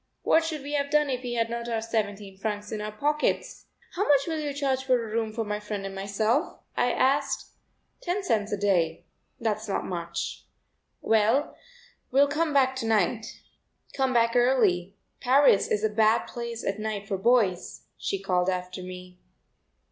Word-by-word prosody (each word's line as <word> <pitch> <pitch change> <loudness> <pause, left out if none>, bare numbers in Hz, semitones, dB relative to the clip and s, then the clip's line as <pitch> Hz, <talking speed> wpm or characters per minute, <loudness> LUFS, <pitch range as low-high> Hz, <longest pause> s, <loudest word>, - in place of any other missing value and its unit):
What 325 - +4
should 315 -3 -4
we 290 +1 -5
have 280 -1 0
done 300 -1 +2
if 250 -1 -2
we 245 -1 -4
had 230 -1 +1
not 235 0 -4
our 230 -1 0
seventeen 205 -3 -3
francs 210 +1 -4
in 215 - -3
our 210 0 -4
pockets? 295 +8 -1 0.3
"How 360 - -3
much 285 -2 +5
will 320 -2 -2
you 295 -1 -2
charge 275 -2 -1
for 260 -1 +3
a 230 -3 -3
room 225 -1 0
for 225 0 -3
my 210 0 -2
friend 210 -1 -5
and 195 - -5
myself?" 215 - 0 0.2
I 245 - +2
asked. 275 +2 +1 0.5
"Ten 375 +3 -2
cents 215 - 0
a 205 - 0
day. 180 -5 +1 0.3
That's 220 -1 -2
not - - -1
much." 170 -2 -4 0.6
"Well, 225 +6 +2 0.5
we'll 275 +2 +4
come 310 +2 0
back 265 -2 +3
to 230 - -3
night." 220 +1 0 0.5
"Come 265 -1 +1
back 230 -1 +2
early; 210 -7 +2 0.2
Paris 260 -4 +4
is 210 0 0
a 220 - +3
bad 220 +1 +3
place 235 -1 -6
at 195 +2 -2
night 215 -2 -4
for 195 -2 -2
boys," 200 -5 +1
she 195 - -2
called 185 -1 +1
after 180 0 -3
me. 180 0 -10
225 Hz, 180 wpm, -27 LUFS, 200-265 Hz, 0.6 s, much